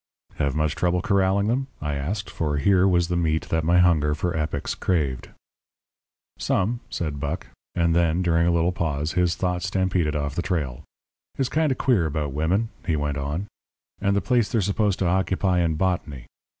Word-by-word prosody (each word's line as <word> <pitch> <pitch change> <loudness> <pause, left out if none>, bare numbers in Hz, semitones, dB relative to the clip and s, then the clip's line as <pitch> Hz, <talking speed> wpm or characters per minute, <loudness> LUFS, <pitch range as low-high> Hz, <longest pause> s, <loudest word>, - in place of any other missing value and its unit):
"Have 70 0 0
much 75 -1 +1
trouble 90 0 0
corralling 100 0 +2
them?" 130 +5 0
I 75 -1 -3
asked, 85 +9 -3
for 75 -3 -2
here 95 +5 +4
was 85 -2 +3
the 90 - -1
meat 80 -2 0
that 80 -1 +1
my 85 +3 +3
hunger 80 -5 +4
for 85 +2 -2
epics 75 -2 -2
craved. 75 -8 -1 1.1
"Some," 115 +6 0
said 75 -4 -3
Buck; 70 +5 -3 0.3
and 85 -1 +2
then, 85 +1 +2
during 85 -1 +2
a - - +4
little 85 +1 +2
pause, 75 -3 -2
his 90 -2 +1
thoughts 90 0 -1
stampeded 95 -5 0
off 70 -2 -2
the 85 - -1
trail. 75 -10 -2 0.5
"It's 135 -2 0
kind 155 -2 +1
of 130 - -1
queer 105 -11 +2
about 75 -2 -3
women," 90 +10 0
he 80 - 0
went 75 -1 -1
on, 75 +7 -3 0.6
"and 100 0 +2
the 100 - +2
place 115 +3 +1
they're 115 -4 +2
supposed 100 0 +1
to 95 - -1
occupy 95 +1 +1
in 85 -2 +1
botany. 75 -7 -2
85 Hz, 185 wpm, -24 LUFS, 75-95 Hz, 1.1 s, here